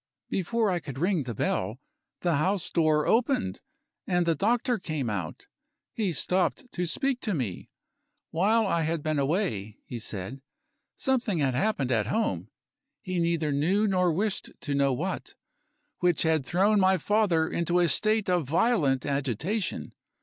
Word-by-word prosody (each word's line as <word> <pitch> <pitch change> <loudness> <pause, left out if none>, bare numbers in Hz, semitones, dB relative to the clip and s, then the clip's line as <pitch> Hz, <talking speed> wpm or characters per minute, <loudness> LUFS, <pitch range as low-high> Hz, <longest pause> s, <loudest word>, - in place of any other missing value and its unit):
Before 215 +3 +1
I 175 - 0
could 140 -5 -8
ring 175 +2 +1
the 120 -2 -4
bell, - - -1 0.4
the 170 -4 +2
house 185 +4 0
door 155 -3 +3
opened, 230 - +1 0.5
and 175 -1 +2
the 165 - +3
doctor 235 - +1
came 155 - -2
out. 90 -6 -5 0.5
He 210 -5 0
stopped 185 - 0
to 180 -1 -2
speak 270 - 0
to 210 -6 -2
me. 115 - -4 0.6
While 215 +7 +3
I 170 -4 +1
had 160 -1 -1
been 155 -2 0
away 135 - -1
(he 120 - -6
said), 110 +4 -5 0.6
something 240 - +1
had 140 -4 +1
happened 140 -3 0
at 105 -4 +1
home 220 - -1 0.5
(he 185 -4 -2
neither 165 -3 +1
knew 175 +10 +2
nor 180 -3 +2
wished 200 +5 -1
to 145 - -3
know 140 -1 +3
what) 175 +9 -3 0.6
which 175 -2 +2
had 160 -4 +1
thrown 200 +4 +3
my 190 0 +4
father 185 -3 +2
into 170 +2 0
a 175 -1 +4
state 215 +4 +1
of 175 -6 +1
violent 160 - +2
agitation. 145 - -2
170 Hz, 155 wpm, -27 LUFS, 140-205 Hz, 0.6 s, my